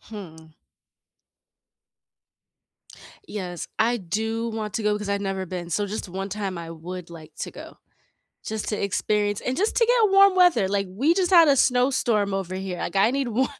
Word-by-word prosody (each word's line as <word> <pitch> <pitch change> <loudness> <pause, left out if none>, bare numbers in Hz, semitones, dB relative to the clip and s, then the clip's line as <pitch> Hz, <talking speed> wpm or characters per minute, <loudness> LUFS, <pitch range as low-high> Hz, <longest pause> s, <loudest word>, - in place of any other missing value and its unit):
Hmm. 160 -7 -11 2.7
Yes, 180 -5 -6
I 235 +2 +2
do 225 +4 -2
want 215 -2 -5
to 225 - -1
go 210 0 +1
'cause 210 -1 -6
I've 200 0 0
never 195 -1 -3
been, 175 -1 -6
so 205 +5 0
just 205 -1 -5
one 195 +2 -5
time 195 -3 -4
I 165 -1 -7
would 175 +1 -8
like 160 -2 -12
to - - -4
go. - - -11 0.7
Just 220 -1 -4
to 210 - -2
experience 205 +1 0
and 255 - -2
just 420 +5 0
to 465 - +4
get 465 -4 +4
warm 395 -1 +7
weather, 350 - +4
like, 200 0 0
we 275 - +2
just 365 -1 +1
had 340 -3 +7
a 280 - +6
snowstorm 245 -6 +2
over 185 -1 -3
here, 190 -1 -4
like - - -4
I 205 +4 +4
need 275 -1 -1
wa 250 +3 +1
205 Hz, 180 wpm, -24 LUFS, 190-245 Hz, 2.7 s, warm